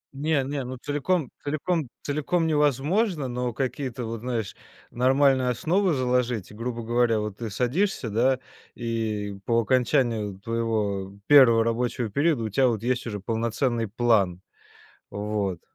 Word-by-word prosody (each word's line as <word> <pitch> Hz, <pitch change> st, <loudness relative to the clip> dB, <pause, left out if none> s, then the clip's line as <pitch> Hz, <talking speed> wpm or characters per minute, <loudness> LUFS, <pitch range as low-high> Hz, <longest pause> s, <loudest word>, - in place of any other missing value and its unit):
Не, 145 Hz, -1 st, +1 dB
не, 140 Hz, 0 st, -3 dB
ну, 130 Hz, +1 st, -6 dB
целиком 145 Hz, +3 st, -1 dB
целиком 155 Hz, -1 st, -1 dB
целиком 150 Hz, +4 st, 0 dB
невозможно, 150 Hz, -, +1 dB
но 125 Hz, 0 st, -2 dB
какие-то, 130 Hz, -1 st, -3 dB
вот, 115 Hz, 0 st, -4 dB
знаешь, 115 Hz, -3 st, -3 dB, 0.4 s
нормальные 130 Hz, 0 st, +3 dB
основы 180 Hz, -, +1 dB
заложить. 125 Hz, -5 st, 0 dB
И, -, -, -12 dB
грубо 115 Hz, +1 st, -4 dB
говоря, 120 Hz, -1 st, +2 dB
вот, 105 Hz, -1 st, -4 dB
ты 115 Hz, -2 st, -4 dB
садишься, 125 Hz, -, -1 dB
да, 130 Hz, +4 st, +2 dB, 0.4 s
и 110 Hz, -4 st, -3 dB
по 115 Hz, 0 st, +2 dB
окончанию 115 Hz, -4 st, +1 dB
твоего 105 Hz, -4 st, -2 dB
первого 120 Hz, -5 st, +7 dB
рабочего 115 Hz, 0 st, -1 dB
периода 145 Hz, -3 st, +1 dB
у 110 Hz, -, -2 dB
тебя, 130 Hz, +5 st, +3 dB
вот, 115 Hz, -2 st, -1 dB
есть 125 Hz, -1 st, -1 dB
уже 105 Hz, -2 st, -4 dB
полноценный 115 Hz, +1 st, -1 dB
план. 100 Hz, -5 st, +2 dB, 0.7 s
Вот. 100 Hz, -3 st, -2 dB
120 Hz, 135 wpm, -25 LUFS, 110-135 Hz, 0.7 s, первого